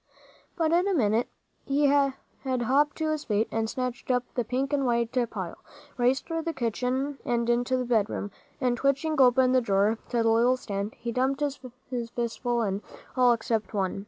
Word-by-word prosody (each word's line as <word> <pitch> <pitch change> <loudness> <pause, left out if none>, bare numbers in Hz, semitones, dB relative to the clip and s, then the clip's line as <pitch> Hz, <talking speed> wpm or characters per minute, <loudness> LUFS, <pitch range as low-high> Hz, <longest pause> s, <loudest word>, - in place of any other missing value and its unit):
But 325 -2 +1
in 350 +3 +3
a 395 - +1
minute 225 -3 +2 0.4
he 285 +1 +2
had 280 -1 +3 0.3
hopped 265 +3 +1
to 315 -1 -1
his 305 -1 -2
feet, 215 0 +1
and 225 0 -1
snatched 250 0 -4
up 250 -1 +2
the 245 - 0
pink 260 +5 -2
and 280 -1 +2
white 235 -2 +1 0.2
pile, - - -6 0.4
raced 250 +2 +1
through 330 -1 -2
the 330 -1 -3
kitchen 260 +3 -1
and 235 -1 0
into 245 +2 +1
the 250 - -1
bedroom, 215 -3 0 0.3
and 250 -2 +1
twitching 275 +4 +1
open 255 0 +5
the 255 0 +4
drawer 205 0 +2
to 235 -2 +1
the 225 - +3
little 240 +3 +4
stand, 200 -3 -4
he 235 - -5
dumped 265 +4 0
his 285 -1 -1 0.6
fistful 240 0 -1
in, 200 -1 -1 0.3
all 250 -1 +5
except 225 -2 -1
one. 195 -1 -1
250 Hz, 185 wpm, -27 LUFS, 230-275 Hz, 0.6 s, open